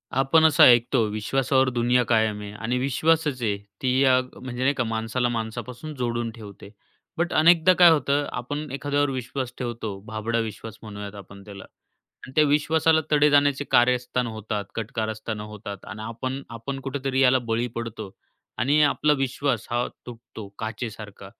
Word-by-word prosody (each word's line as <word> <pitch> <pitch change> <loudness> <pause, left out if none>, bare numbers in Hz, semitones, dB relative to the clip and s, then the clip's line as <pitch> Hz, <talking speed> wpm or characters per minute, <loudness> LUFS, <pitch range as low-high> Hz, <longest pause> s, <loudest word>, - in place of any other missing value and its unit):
आपण 135 +5 +4
असं 155 -2 +6
ऐकतो 120 0 +5
विश्वासावर 130 +5 +1
दुनिया 125 0 +2
कायम 110 -2 +1
आहे 100 0 -7
आणि 115 +4 -2
विश्वासच 150 +1 +1
आहे, 105 -3 0 0.2
ती 130 0 +1
या 130 -2 +5 0.2
म्हणजे 125 -1 -6
नाही 140 +2 +3
का 130 - -1
माणसाला 115 +2 -1
माणसापासून 120 +5 -5
जोडून 120 -2 -2
ठेवते. 105 -3 -12 0.5
बट 170 +1 -1
अनेकदा 170 +2 +5
काय 175 -1 +7
होतं 145 -1 +1
आपण 145 +5 -5
एखाद्यावर 145 +1 0
विश्वास 130 0 -4
ठेवतो, 115 -5 -5
भाबडा 110 +2 -2
विश्वास 110 -1 -6
म्हणूयात 105 -1 -8
आपण 100 0 -12
त्याला 100 -2 -10
आणि 130 - -19
त्या 155 - +5
विश्वासाला 160 +2 +3
तडे 150 0 +5
जाण्याचे 145 -1 +3
कार्यस्थान 125 0 +2
होतात, 110 -2 -4
कटकारस्थानं 110 -1 -4
होतात 105 -2 -9
आणि 110 -1 -8
आपण, 130 +4 -4
आपण 120 +4 -6
कुठेतरी 135 0 -3
याला 130 0 +5
बळी 115 0 -1
पडतो 115 -4 -6 0.5
आणि 140 +6 +3
आपला 150 +1 +2
विश्वास 135 -3 -1
हा 120 +1 0 0.2
तुटतो, 115 -3 -10
काचेसारखा 110 -2 -6
120 Hz, 150 wpm, -24 LUFS, 110-140 Hz, 0.5 s, काय